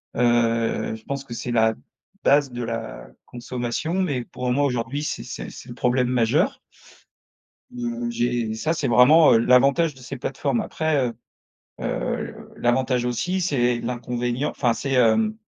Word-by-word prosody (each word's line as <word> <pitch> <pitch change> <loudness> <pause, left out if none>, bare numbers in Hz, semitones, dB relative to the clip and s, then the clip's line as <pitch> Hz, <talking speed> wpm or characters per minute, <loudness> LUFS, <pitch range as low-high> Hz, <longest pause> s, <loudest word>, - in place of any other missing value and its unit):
heu, 115 -2 +1
je 110 - -13
pense 140 +2 -4
que 120 - -8
c'est 120 +1 -4
la 110 -1 +3 0.5
base 140 -1 +4
de 120 0 -5
la 115 -1 -5 0.2
consommation 125 +6 -4
mais 155 -10 0
pour 125 +1 -4
moi, 140 +3 +2
aujourd'hui, 125 +2 -2
c'est - - -3
c'est - - -7
c'est - - -12
le 120 - -8
problème 125 0 +1
majeur 125 - +1 1.1
mmh, 240 -1 -4
j'ai 120 - -1
ça, 155 +8 -1
c'est 145 -4 -1
vraiment, 145 +7 +7
heu, - - +6
l'avantage 140 +7 +4
de 130 - -16
ces 130 +2 -7
plateformes 135 0 -2
après, 155 -5 0
heu 115 - -7 0.7
heu, - - -4
l'avantage 125 0 +1
aussi 180 +10 -1
c'est 125 -9 +1
l'inconvénient 125 +3 -2
enfin, 120 -4 0
c'est, 135 +5 -3
hem, 135 - +3
125 Hz, 155 wpm, -23 LUFS, 120-145 Hz, 1.1 s, vraiment